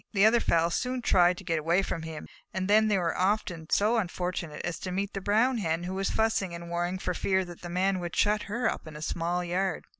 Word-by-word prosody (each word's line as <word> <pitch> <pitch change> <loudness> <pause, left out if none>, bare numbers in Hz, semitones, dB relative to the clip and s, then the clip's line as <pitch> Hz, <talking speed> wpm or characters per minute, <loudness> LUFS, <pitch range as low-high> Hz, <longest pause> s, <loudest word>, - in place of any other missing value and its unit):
The 200 0 +5
other 230 +2 +5
fowls 170 -4 +2
soon 250 -1 -2
tried 180 -3 +4
to 195 - -9
get 165 -3 0
away 170 +5 +2
from 165 - -3
him, 160 -1 -7 0.3
and 190 0 -1
then 215 +2 +5
they 210 -2 +2
were 170 -3 0
often 185 -4 -1
so 215 +4 +3
unfortunate 180 -4 -3
as 175 -1 -3
to 185 - -5
meet 195 +2 -2
the 195 - -4
Brown 225 +6 +2
Hen, 165 -3 -1
who 180 +1 -4
was 195 +1 -1
fussing 210 -5 0
and 170 0 -8
worrying 175 +2 -1
for 185 -1 -2
fear 190 +1 +1
the 175 0 -9
Man 185 +2 +1
would 175 -1 -5
shut 210 0 +2
her 240 +4 0
up - - -3
in 155 - -9
a 150 - -7
small 170 +2 -1
yard. 180 0 -1
185 Hz, 240 wpm, -28 LUFS, 170-205 Hz, 0.3 s, The